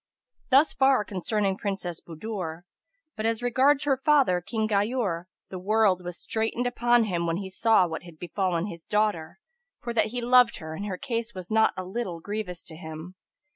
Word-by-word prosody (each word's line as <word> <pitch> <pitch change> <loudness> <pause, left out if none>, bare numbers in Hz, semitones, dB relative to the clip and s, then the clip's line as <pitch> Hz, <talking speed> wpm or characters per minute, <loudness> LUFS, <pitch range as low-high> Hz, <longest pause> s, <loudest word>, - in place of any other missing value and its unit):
[FN#282] - - -36
Thus 275 +4 +5
far 265 -5 +3
concerning 195 0 -1
Princess 195 -5 -3
Budur; 170 -1 -6 0.5
but 220 0 -1
as 230 +1 -1
regards 265 +4 +3
her 275 -2 +2
father, 270 -13 +4
King 220 +3 -2
Ghayur, 205 -4 0 0.2
the 185 - -6
world 200 -2 +2
was 175 -1 -6
straitened 225 +2 -1
upon 240 -1 +3
him 175 -5 -1
when 165 0 0
he 190 -1 -6
saw 220 -1 +4
what 160 -2 -5
had 170 -3 -13
befallen 180 0 -1
his 170 -5 -8
daughter, 210 - 0 0.4
for 235 - -5
that 220 -2 +2
he 245 +3 -4
loved 245 0 +5
her 160 -1 -7
and 200 +6 -5
her 185 -3 -3
case 235 -3 -3
was 185 0 -8
not 220 0 +3
a 185 - -3
little 185 -3 -4
grievous 200 -1 -5
to 160 - -10
him. 160 +2 -8
205 Hz, 185 wpm, -27 LUFS, 180-235 Hz, 0.5 s, Thus